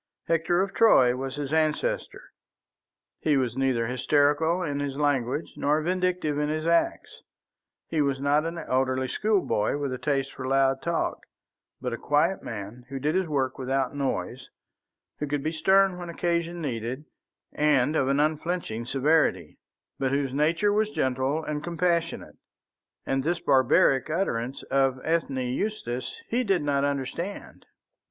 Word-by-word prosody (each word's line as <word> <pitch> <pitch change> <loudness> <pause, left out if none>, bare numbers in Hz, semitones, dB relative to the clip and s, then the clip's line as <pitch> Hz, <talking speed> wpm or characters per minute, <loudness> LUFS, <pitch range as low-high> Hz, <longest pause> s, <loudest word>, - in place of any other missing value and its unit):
Hector 165 +2 +2
of 195 0 -5
Troy 130 - +5
was 135 +1 -4
his 145 0 -4
ancestor; 160 - 0 1.0
he 150 -3 +2
was 125 -3 0
neither 130 -3 +1
hysterical 145 +7 +2
in 145 -4 -2
his 140 -1 -3
language 145 0 0
nor 150 +2 +2
vindictive 180 -4 0
in 150 0 0
his 155 +1 -2
acts; 170 0 0 0.7
he 160 -2 0
was 140 -2 0
not 145 +2 +2
an 165 +1 -4
elderly 130 -4 0
schoolboy 190 - 0
with 140 -3 -2
a 130 - -5
taste 135 -1 -1
for 130 - -6
loud 135 0 +2
talk, 170 -1 -2 0.5
but 125 -1 -3
a 115 - -5
quiet 165 +6 +1
man 110 +3 -7
who 135 - -5
did 150 +3 0
his 185 -1 +1
work 135 -4 -1
without 135 0 -1
noise, 130 -2 -3 0.7
who 150 - -2
could 145 -1 -2
be 155 - -1
stern 190 +3 +3
when 175 -1 -6
occasion 170 0 -1
needed 125 +2 -4 0.5
and 150 -1 +2
of 135 - +2
an 140 +1 +2
unflinching 155 -6 -1
severity, 150 +5 +1 0.4
but 135 - +1
whose 135 -1 -1
nature 165 +8 +2
was 215 0 +2
gentle 130 -2 -1
and 150 -1 -4
compassionate. 170 -1 -1 0.7
And 135 0 0
this 170 +3 0
barbaric 130 0 +3
utterance 135 -7 -2
of 135 -1 +2
Ethne 160 -4 0 0.2
Eustace 130 - -3
he 245 +2 0
did 195 -8 +1
not 140 -1 +1
understand. 145 +7 -4
145 Hz, 150 wpm, -26 LUFS, 130-170 Hz, 1.0 s, Troy